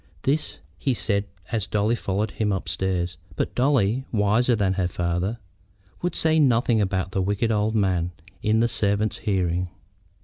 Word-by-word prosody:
This 145 +3 0 0.2
he 135 -3 +1
said 100 -2 0 0.3
as 110 -4 -1
Dolly 105 +2 +1
followed 105 -2 -1
him 105 -2 -1
upstairs; 90 -2 -1 0.2
but - - -2
Dolly, 125 -2 +2
wiser 110 +3 +3
than 100 -3 +1
her 95 -2 0
father, 90 +5 -1 0.6
would 175 - -1
say 160 0 +3
nothing 120 -5 +3
about 95 -2 -1
the 95 - 0
wicked 105 +4 0
old 110 +1 +1
man 90 -5 +1 0.3
in 110 +1 +2
the 120 - +4
servants' 105 -1 +1
hearing. 90 -3 0
105 Hz, 150 wpm, -24 LUFS, 95-115 Hz, 0.6 s, the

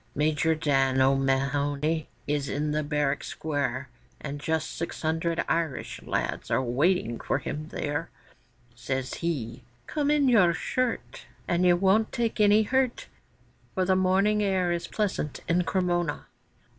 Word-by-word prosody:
Major 155 +2 +2
Dan 135 -4 +2
O'Mahony 140 +3 +1 0.2
is 145 -1 -1
in 150 +1 -1
the 155 +1 0
barrack 145 -1 0
square, 140 -4 -2 0.3
And 145 -1 -5
just 160 0 -1
six 165 - -5
hundred 165 +1 0
Irish 165 -5 -2
lads - - -3
are - - +2
waiting 130 0 +1
for - - 0
him 150 +2 -5
there; 145 -2 -3 0.6
Says 130 +2 -3
he, 130 -8 -3 0.2
'Come 295 -2 -1
in 295 -2 +3
your 185 -9 +5
shirt, 255 -2 -2 0.2
And 175 +1 +2
you 175 - +6
won't 195 +4 +3
take 230 -2 -1
any 210 +1 +5
hurt, 260 +2 0 0.7
For 185 -2 +1
the 190 0 +3
morning 195 +3 +3
air 190 -3 +1
is 170 0 -2
pleasant 195 -8 -2
in 175 +1 +2
Cremona. 175 -3 0
160 Hz, 140 wpm, -27 LUFS, 140-185 Hz, 0.7 s, you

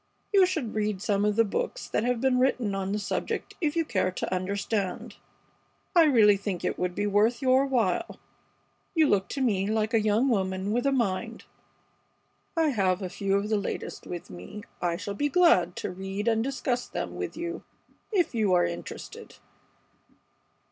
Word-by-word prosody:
You 385 -2 +6
should 300 -11 -3
read 210 -2 -1
some 200 0 0
of 210 -1 +1
the 230 +1 +4
books - - -3
that - - -1
have 245 0 0
been 260 0 +2
written 250 -5 +1
on 195 0 -2
this 205 0 -2
subject - - -3
if 310 -1 0
you 330 -1 +1
care 185 -8 0
to 185 - -4
understand. 195 +1 -2 0.8
I 335 -2 +7
really 215 -8 +5
think 195 -2 -4
it - - -2
would 180 0 -1
be 205 - -1
worth 210 +4 +2
your 265 +1 +3
while. 245 - 0 0.8
You 320 -1 +5
look 195 -5 +2
to 275 - -3
me 200 -6 +1
like 220 +1 0
a 225 - +4
young 215 +5 +2
woman 190 -4 0
with 245 +4 +1
a - - +3
mind. 230 -2 -1 1.1
I 325 -1 +3
have 195 -6 +1
a 185 - -3
few 195 +1 -1
of 200 +1 0
the 215 - +2
latest 200 - -5
with 175 - -7
me. 90 - -9 0.2
I 170 -1 0
shall 200 +2 -5
be 290 +8 0
glad 260 - +4
to - - -4
read 195 +3 -5
and 225 -1 +2
discuss 255 -1 -2
them - - -5
with - - -5
you 340 +1 -4 0.5
if 370 -9 +1
you 215 -5 +2
are 180 - +4
interested." 85 0 -7
210 Hz, 180 wpm, -27 LUFS, 195-260 Hz, 1.1 s, I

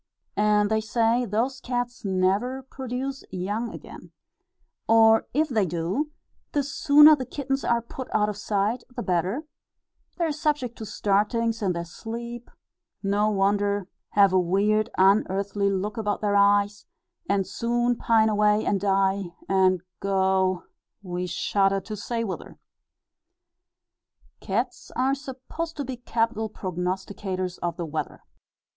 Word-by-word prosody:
And, 210 0 +3
they 220 0 +2
say, 230 +2 +1
those 240 +5 -1
cats 245 -1 -3
never 200 +7 0
produce 265 +1 -5
young 205 +5 -3
again; - - -11 0.8
or, 225 0 +5
if 310 +4 +2
they 220 -8 +1
do, 175 - -2 0.4
the 290 - +2
sooner 295 +2 +7
the 265 - -4
kittens 270 +1 -3
are 235 -1 +1
put 255 +2 -7
out 210 0 +2
of 210 - -3
sight 205 +3 -1
the 240 - -3
better; 185 - 0 0.7
they 345 - +1
are 320 - 0
subject 295 -6 -1
to 220 - -6
startings 225 +3 0
in 190 -3 +1
their 170 0 -4
sleep 235 +6 -7 0.5
no 205 +2 +2
wonder 200 -1 +1 0.3
have 200 -2 +5
a 185 - +5
weird 205 +5 +2
unearthly 200 +1 +2
look 200 +3 -2
about 210 -2 -1
their 205 -1 +1
eyes, 200 +1 +3 0.4
and 200 -1 +2
soon 240 +3 0
pine 225 -1 +3
away, 210 0 +3
and 200 - +1
die, 195 -2 +1
and 185 -2 +3 0.2
go 190 -2 +1 0.4
we 180 -1 -3
shudder 195 +2 +1
to 215 +2 -6
say 230 +3 -3
whither. 195 -4 -6 1.8
Cats - - -3
are 260 +2 +2
supposed 280 +4 -6
to 285 - -3
be 255 -1 -5
capital 225 -2 -1
prognosticators 185 0 -4
of 175 -1 -3
the 170 - -3
weather. 155 -1 -5
210 Hz, 135 wpm, -25 LUFS, 195-240 Hz, 1.8 s, sooner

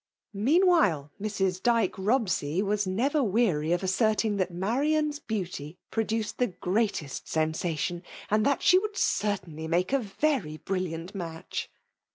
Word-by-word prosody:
Meanwhile, 235 - +3
Mrs. 190 -3 -1
Dyke 230 -4 +2
Robsey 190 - +1
was 205 -1 0
never 265 +11 +1
weary 190 - +1
of 175 +2 +1
asserting 215 +2 +1
that 185 -2 0
Marian's 290 - 0
beaut 205 - -3
j 150 +1 -8
pro* 225 - +1
duced 220 0 -3
the 250 - +3
greatest 180 - -2
sensation, 160 +2 -1 0.3
and 215 0 +3
that 280 +3 +2
shd 370 +1 +5
would 420 0 -5
certainly 180 -6 -1
make 175 +8 +1
a 275 - +4
very 215 - -1
brilliant 180 0 -3
match. 165 -4 -5
200 Hz, 140 wpm, -28 LUFS, 175-235 Hz, 0.3 s, shd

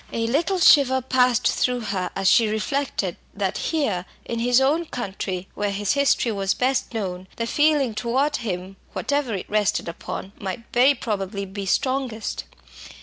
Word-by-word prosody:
A 230 0 -1
little 320 +11 +1
shiver 275 -6 +6
passed 250 -2 +2
through 250 -1 +1
her 200 -4 -2
as 195 0 0
she 225 +4 +5
reflected 220 - -1 0.2
that 195 -2 -1
here, 215 - -1 0.2
in 235 - -3
his 245 +2 +4
own 300 +6 +2
country, 190 - -4
where 205 0 -1
his 200 0 0
history 280 -4 +2
was 195 -2 0
best 265 +1 0
known, 185 -3 -4
the 230 - -2
feeling 290 -2 +2
towards 260 +7 0
him, 190 -4 -5 0.2
whatever 285 -6 -1
it 190 - -5
rested 210 -4 +1
upon, 170 +3 -6
might 195 +4 -5
very 260 +4 +5
probably 200 -4 -3
be 195 0 -6
strongest. 255 0 -1
230 Hz, 155 wpm, -23 LUFS, 195-265 Hz, 0.2 s, shiver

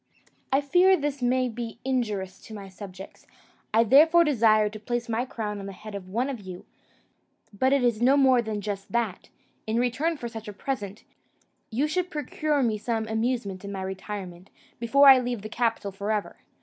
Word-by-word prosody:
I 270 +2 +3
fear 360 +6 +4
this 285 -3 -3
may 255 +1 +2
be 230 -1 -6
injurious 210 -8 -2
to 220 - -9
my 200 -2 -9
subjects; 190 0 -11 0.4
I 225 +1 +5
therefore 310 +9 +6
desire 225 -8 +4
to 215 +1 -7
place 240 +2 -3
my 230 +2 -1
crown 210 -5 -4
on 195 - -7
the 195 - -7
head 215 +2 -10
of 190 -2 -7
one 235 +7 0
of 270 -4 -4
you; 185 -2 -9 0.9
but 260 +6 +1
it 275 -2 +3
is 235 -2 +1
no 265 +3 +5
more 260 -3 +5
than 215 -2 -4
just 200 -1 -5
that, 230 -6 -2 0.4
in 220 +1 0
return 270 +7 0
for 240 - -5
such 225 -1 -8
a 210 - -6
present, 205 -3 -5 0.7
you 260 +7 0
should 360 +3 -1
procure 300 -1 -1
me 220 -3 0
some 225 0 -2
amusement 220 -4 -2
in 200 - -6
my 190 -1 -4
retirement, 190 -1 -7 0.3
before 275 +5 +5
I 265 -1 +10
leave 245 -4 -3
the 215 - -6
capital 225 -3 -1
for 200 +2 -3
ever. 210 -2 -2
230 Hz, 190 wpm, -26 LUFS, 205-260 Hz, 0.9 s, I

